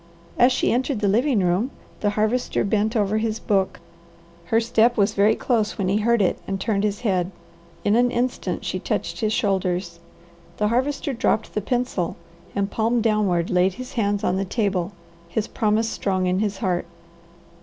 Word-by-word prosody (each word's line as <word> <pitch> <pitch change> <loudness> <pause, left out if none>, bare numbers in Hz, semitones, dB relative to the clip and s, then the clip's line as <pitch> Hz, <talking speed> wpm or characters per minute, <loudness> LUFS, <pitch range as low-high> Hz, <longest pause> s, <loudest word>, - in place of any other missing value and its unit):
As 245 +2 +6
she 255 - +1
entered 255 0 0
the 205 - +1
living 230 +1 +2
room 180 +8 +1 0.3
the 205 - +1
Harvester 220 +4 +1
bent 215 +3 0
over 210 0 +1
his 220 0 -1
book. 195 -2 0 0.7
Her 225 +5 +2
step 235 +1 +2
was 205 0 +3
very 210 +2 +4
close 220 -3 0
when 190 -3 0
he 200 - +2
heard 230 0 +3
it 180 - 0
and 195 0 -2
turned 200 0 0
his 205 -1 -1
head. 185 -6 +1 0.6
In 205 - +4
an 245 +1 +4
instant 245 +1 -2
she - - -2
touched - - -3
his 215 -2 0
shoulders. 185 -6 -1 0.6
The 210 0 +1
Harvester 270 +4 0
dropped 225 -2 0
the 210 - -1
pencil, 240 -6 -1 0.4
and 200 0 -1
palm 230 +2 +1
downward 205 -6 +1
laid 180 +1 +2
his 255 +1 -8
hands 205 -3 0
on 180 - +1
the 195 - 0
table, 195 -3 -1 0.4
his 210 +4 -1
promise 220 0 +1
strong 185 -4 -1
in 180 +1 +1
his 205 -2 -1
heart. 185 -4 -1
210 Hz, 175 wpm, -23 LUFS, 195-230 Hz, 0.7 s, As